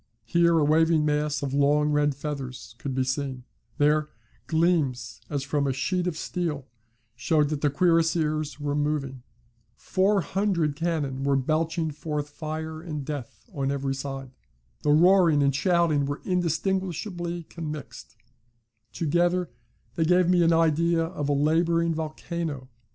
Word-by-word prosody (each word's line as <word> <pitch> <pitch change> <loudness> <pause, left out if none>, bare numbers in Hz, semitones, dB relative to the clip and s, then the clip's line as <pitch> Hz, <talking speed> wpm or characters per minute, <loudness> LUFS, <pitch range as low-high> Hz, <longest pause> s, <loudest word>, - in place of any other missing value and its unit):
Here 170 -1 +3
a 155 - +3
waving 160 +1 +3
mass 150 -1 0
of 135 -1 -3
long 145 +1 +3
red 145 -1 +2
feathers 135 -5 -6
could 135 -2 -4
be 130 - +1
seen; 130 -1 -3 0.3
there, 150 +1 +2 0.4
gleams 160 -6 0
as 140 -2 -2
from 140 0 0
a 135 - +1
sheet 180 +7 -1
of 165 -3 -2
steel 160 -6 -3 0.5
showed 145 +4 +1
that 150 -2 -3
the 145 - +3
cuirassiers 160 -2 +1
were 145 -1 -2
moving; 145 -3 -2 0.5
400 190 - +1
cannon 150 -5 -2
were 140 0 +2
belching 160 +4 0
forth 150 0 -4
fire 155 +1 -5
and 150 -5 -5
death 145 - -7
on 135 -4 -1
every 140 -1 -1
side; 135 -1 -6 0.5
the - - 0
roaring 170 -2 +5
and 140 -1 +2
shouting 170 -4 +2
were 145 +1 -4
indistinguishably 175 0 -1
commixed 155 -3 -8 0.8
together 175 +2 0 0.4
they 165 - 0
gave 180 +2 +3
me 180 -1 +4
an 170 0 +4
idea 165 +1 +3
of 165 -4 -3
a - - +3
labouring 165 +3 +2
volcano. 155 -3 -4
155 Hz, 140 wpm, -26 LUFS, 145-170 Hz, 0.8 s, roaring